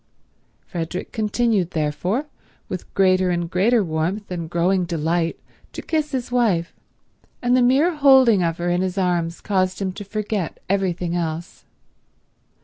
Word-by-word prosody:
Frederick 175 0 -5
continued, 215 -3 0
therefore, 175 - -1 0.4
with 185 -2 -6
greater 185 -1 +3
and 175 -1 -1
greater 215 +5 +3
warmth 175 +5 -2
and 170 -3 -4
growing 180 +2 +1
delight 165 0 -1 0.3
to - - -7
kiss 310 -2 -1
his 255 -3 -3
wife, 210 -9 +1 0.7
and 245 0 +2
the 255 - +4
mere 275 +8 +4
holding 265 -8 +6
of 165 -1 0
her 175 - -3
in 175 +1 +1
his 185 +1 -2
arms 175 -3 0
caused 185 -2 0
him 195 -2 -1
to 205 +3 -8
forget 205 -3 -3
everything 180 -3 -1
else. 165 0 -4
185 Hz, 140 wpm, -22 LUFS, 170-220 Hz, 0.7 s, holding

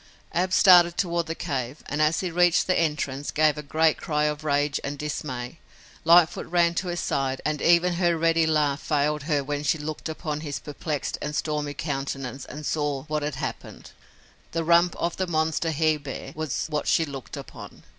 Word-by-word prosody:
Ab 185 +2 0
started 175 -3 +6
toward 170 -3 0
the 165 - -3
cave, 135 -4 -4
and 150 - -2
as 155 +2 +2
he 180 -2 -3
reached 175 0 +3
the 185 - +2
entrance, 150 -4 -1
gave 155 -1 +3
a 150 - -5
great 155 +2 +2
cry 150 -1 -1
of 150 0 -1
rage 145 -1 +1
and 145 +1 -4
dismay. 135 -2 -5 0.5
Lightfoot 170 0 +5
ran 170 0 +3
to 180 +2 -2
his 175 0 -2
side 135 -1 -1
and 150 -1 -1
even 175 +1 +4
her 170 -1 +1
ready 165 0 +2
laugh 150 -2 +1
failed 150 0 0
her 145 -2 +2
when 145 +1 -3
she 150 +2 +1
looked 155 +1 -5
upon 155 -1 -4
his 145 -3 -4
perplexed 150 0 -4
and 150 0 -4
stormy 150 -2 -2
countenance 135 -3 -4
and 150 0 -8
saw 145 -3 -1
what 155 0 -2
had 145 -1 -3
happened. - - -6 0.6
The 165 0 0
rump 170 +2 +4
of 170 - -2
the 185 - -1
monster 160 0 0
he 155 0 +2
bear 135 -2 -7
was 155 -4 -2
what 150 -1 -2
she 165 - +3
looked 140 -3 -8
upon. - - -10
155 Hz, 190 wpm, -25 LUFS, 145-165 Hz, 0.6 s, started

